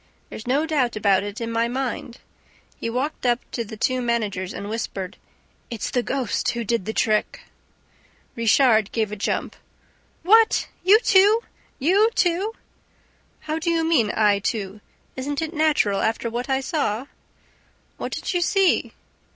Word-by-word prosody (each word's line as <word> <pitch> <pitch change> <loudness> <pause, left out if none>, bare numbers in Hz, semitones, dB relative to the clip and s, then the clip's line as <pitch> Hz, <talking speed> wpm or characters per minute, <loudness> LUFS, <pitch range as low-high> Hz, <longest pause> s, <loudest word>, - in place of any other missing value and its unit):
There's 220 - -8
no 280 +5 +2
doubt 275 -8 0
about 200 -3 +3
it 205 +1 -6
in 230 -1 -4
my 230 0 +1
mind." 245 -1 -4 0.6
He - - -4
walked 260 +6 -3
up 240 -1 +2
to 235 - -2
the 220 0 -9
two 255 +3 0
managers 210 -6 -1
and 200 - -6
whispered. 205 -3 -4 0.5
"It's 230 -3 -4
the 245 - +1
ghost 255 -2 -1
who 235 0 -2
did 230 -3 -1
the 220 - -2
trick!" 215 -1 0 0.9
Richard 230 -2 +3
gave 220 -3 -1
a - - -3
jump. 200 - -2 0.7
"What, 445 +5 +4 0.2
you 400 +4 +7
too! 410 +2 +5 0.4
You 385 +10 +3
too!" 375 +5 +1 0.9
"How 310 +1 -3
do 340 - -1
you 330 -1 +1
mean, 295 -10 +2
I 210 -2 +4
too? 205 -1 -3 0.3
Isn't 280 +2 -3
it 320 0 -3
natural, 300 - +2
after 225 +1 -1
what 245 +3 -4
I 265 0 +1
saw?" 260 -5 -1 0.9
"What - - -5
did - - -3
you 355 - +1
see?" 390 0 +2
240 Hz, 155 wpm, -23 LUFS, 215-315 Hz, 0.9 s, you